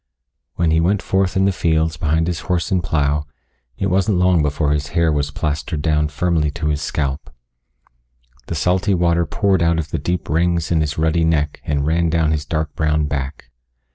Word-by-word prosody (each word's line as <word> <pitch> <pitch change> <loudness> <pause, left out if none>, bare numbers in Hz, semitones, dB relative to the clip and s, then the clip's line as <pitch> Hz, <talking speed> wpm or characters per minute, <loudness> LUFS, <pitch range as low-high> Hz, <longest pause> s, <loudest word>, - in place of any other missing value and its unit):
When 85 -2 +1
he 80 - +3
went 95 +4 +1
forth 95 -1 0
in 95 - +3
the 100 - +3
fields 80 -2 0
behind 80 +2 0
his 85 -1 -2
horse 90 +2 -2
and 90 -2 +1
plow, 75 -2 0 0.5
it - - -2
wasn't 95 +1 +1
long 90 -2 +3
before 75 0 0
his 75 -1 -1
hair 85 -1 +3
was 75 -1 0
plastered 75 +1 -3
down 75 -2 +2
firmly 80 +1 0
to 75 +1 -3
his 75 -1 -1
scalp. 70 +1 -3 1.2
The 85 - -3
salty 95 +5 +1
water 85 -1 +1
poured 95 0 +1
out 85 0 +2
of 80 -3 -3
the - - -1
deep 90 -1 -2
rings 85 +1 0
in 80 -2 +3
his 75 -1 -2
ruddy 80 +1 +1
neck 75 -2 0
and 70 -2 0
ran 85 +2 +1
down 80 -1 +1
his 75 -2 -1
dark 80 -1 -2
brown 75 -2 +1
back. 70 -3 -5
80 Hz, 195 wpm, -19 LUFS, 75-85 Hz, 1.2 s, he